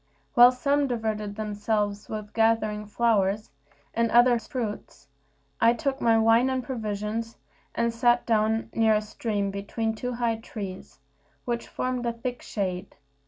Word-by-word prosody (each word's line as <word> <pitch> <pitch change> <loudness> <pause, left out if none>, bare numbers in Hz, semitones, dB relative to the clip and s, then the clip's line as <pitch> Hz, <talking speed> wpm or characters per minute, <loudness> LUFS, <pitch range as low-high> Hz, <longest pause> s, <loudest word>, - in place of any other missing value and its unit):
While 245 0 +8
some 280 +3 +1
diverted 215 -4 -2
themselves 210 -1 -2
with 215 -1 -6
gathering 220 -2 +1
flowers, 210 -2 +1 0.4
and 230 0 +1
others 240 -1 +4
fruits, 210 - -5 0.5
I 230 +1 +5
took 270 +3 -2
my 230 -1 +4
wine 225 +3 +4
and 260 -1 -1
provisions, 225 -2 -4 0.4
and 235 0 +1
sat 240 +1 +3
down 220 0 +1
near 220 -1 +3
a 210 - +1
stream 210 -2 -2
between 215 +3 -2
two 250 +3 -4
high 235 -2 0
trees, 195 -7 -8 0.5
which 235 -1 -2
formed 250 -1 -2
a 235 - 0
thick 245 +1 -5
shade. 185 -3 -4
225 Hz, 140 wpm, -26 LUFS, 210-240 Hz, 0.5 s, While